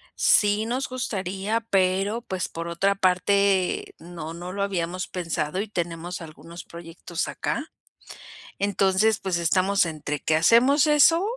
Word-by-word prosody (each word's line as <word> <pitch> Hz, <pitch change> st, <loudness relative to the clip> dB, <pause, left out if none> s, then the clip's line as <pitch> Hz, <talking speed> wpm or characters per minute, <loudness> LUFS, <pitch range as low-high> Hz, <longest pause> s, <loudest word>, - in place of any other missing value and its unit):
Sí 210 Hz, +1 st, +3 dB
nos 255 Hz, +4 st, -2 dB
gustaría, 205 Hz, -3 st, -2 dB
pero, 195 Hz, +4 st, +1 dB
pues, 185 Hz, -4 st, -3 dB
por 165 Hz, +1 st, -6 dB
otra 190 Hz, +4 st, +1 dB
parte, 190 Hz, 0 st, +1 dB
no 165 Hz, -2 st, -8 dB
no 175 Hz, +2 st, -7 dB
lo 200 Hz, 0 st, -2 dB
habíamos 185 Hz, -1 st, -2 dB
pensado, 165 Hz, -1 st, -3 dB
y 215 Hz, -, -5 dB
tenemos 175 Hz, -2 st, -4 dB
algunos 165 Hz, +2 st, -11 dB
proyectos 170 Hz, 0 st, -6 dB
acá. 300 Hz, +3 st, -4 dB, 0.9 s
Entonces, 200 Hz, +1 st, +2 dB
pues 190 Hz, -3 st, -1 dB
estamos 185 Hz, +3 st, +2 dB
entre 150 Hz, -2 st, -4 dB
que 155 Hz, -, +1 dB
hacemos 250 Hz, -, +4 dB
eso 300 Hz, +4 st, +5 dB
185 Hz, 130 wpm, -24 LUFS, 170-205 Hz, 0.9 s, eso